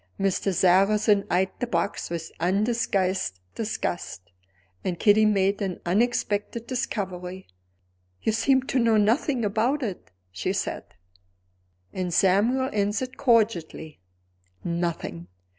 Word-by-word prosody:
Mr. 195 0 +1
Sarrazin 195 +3 +3
eyed 185 +1 +1
the 245 - -2
box 170 -6 -2
with 165 -1 -5
undisguised 190 - 0
disgust; 175 - -4 0.5
and 180 -2 -2
Kitty 215 +1 +5
made 200 0 +1
an 190 -3 -3
unexpected 210 +2 0
discovery. 190 -7 -4 0.8
"You - - +2
seem 260 +4 +2
to 265 0 0
know 230 -2 +3
nothing 235 +3 +2
about 235 +8 0
it," 195 - -5 0.2
she 90 - -2
said. - - -3 1.1
And 185 -1 -3
Samuel 215 +9 +3
answered, 210 +5 -1
cordially, 210 - +1 0.6
"Nothing!" 170 - -3
200 Hz, 110 wpm, -25 LUFS, 180-230 Hz, 1.1 s, Kitty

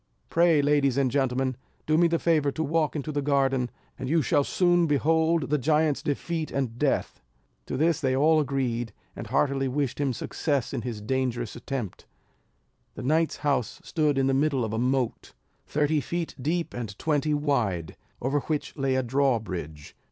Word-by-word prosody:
Pray, 165 -3 +4
ladies 140 -2 +2
and 135 -3 +2
gentlemen, 130 -1 0 0.3
do 155 - +2
me 170 +2 +5
the 165 0 +1
favour 155 -4 +2
to 160 - -2
walk 155 -1 0
into 150 +1 -3
the 145 -1 -1
garden, 135 -3 +1 0.3
and 130 - -4
you 160 0 +3
shall 145 - +2
soon 175 +1 +2
behold 160 +1 +2
the 150 - +3
giant's 150 +1 +2
defeat 160 +2 -2
and 125 -4 -3
death." - - 0 0.5
To - - -3
this 160 +2 +2
they 130 -2 +1
all 155 +3 +4
agreed, 125 -6 -1 0.2
and - - -7
heartily 135 -1 +1
wished 135 0 -2
him 140 -2 +1
success 140 +2 -2
in 130 - -2
his 115 -2 -5
dangerous 120 -1 -2
attempt. 120 -5 -5 0.9
The - - -6
knight's 155 +3 +1
house 140 -5 0
stood 150 -3 0
in 135 - +3
the 135 - +2
middle 135 -3 +1
of 110 - -4
a 110 - -1
moat, 125 -1 -1 0.3
thirty 150 0 +1
feet 170 +3 -3
deep 165 +5 -1
and 110 -4 -6
twenty 150 -1 +1
wide, 120 - -1 0.3
over 135 +3 +1
which 150 +1 -3
lay 135 -2 0
a 130 - +1
drawbridge. 110 - -1
140 Hz, 175 wpm, -26 LUFS, 130-155 Hz, 0.9 s, me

